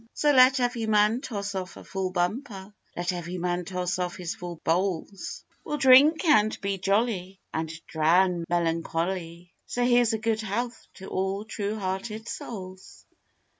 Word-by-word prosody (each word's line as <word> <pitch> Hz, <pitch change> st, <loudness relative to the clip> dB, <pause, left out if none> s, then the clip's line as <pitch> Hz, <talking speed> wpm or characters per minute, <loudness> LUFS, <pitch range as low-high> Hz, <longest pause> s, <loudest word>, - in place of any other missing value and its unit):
So 295 Hz, -, +3 dB
let 260 Hz, 0 st, +6 dB
every 245 Hz, -2 st, -1 dB
man 215 Hz, +3 st, +3 dB
toss 200 Hz, -5 st, -4 dB
off 185 Hz, -1 st, -5 dB
a -, -, -11 dB
full 190 Hz, -1 st, -3 dB
bumper, 195 Hz, +2 st, -3 dB, 0.2 s
Let 175 Hz, +1 st, -1 dB
every 175 Hz, +1 st, -5 dB
man 175 Hz, 0 st, -1 dB
toss 180 Hz, 0 st, -2 dB
off 180 Hz, -1 st, -2 dB
his 175 Hz, -2 st, -4 dB
full 175 Hz, -2 st, -8 dB
bowls; 185 Hz, +2 st, -2 dB, 0.2 s
We'll 295 Hz, -, -3 dB
drink 280 Hz, +5 st, +6 dB
and 215 Hz, -9 st, +4 dB
be 195 Hz, -1 st, -2 dB
jolly, 195 Hz, -1 st, 0 dB
and 160 Hz, 0 st, -2 dB, 0.2 s
drown 170 Hz, +2 st, +2 dB
melancholy, 170 Hz, +1 st, -2 dB
So 245 Hz, 0 st, 0 dB
here's 245 Hz, -2 st, +4 dB
a -, -, +1 dB
good 220 Hz, 0 st, -1 dB
health 230 Hz, +3 st, -4 dB
to 190 Hz, -, -10 dB
all 195 Hz, +2 st, -2 dB
true 210 Hz, 0 st, -3 dB
hearted 210 Hz, +3 st, -4 dB
souls! 190 Hz, -4 st, -8 dB
195 Hz, 155 wpm, -27 LUFS, 180-225 Hz, 0.2 s, let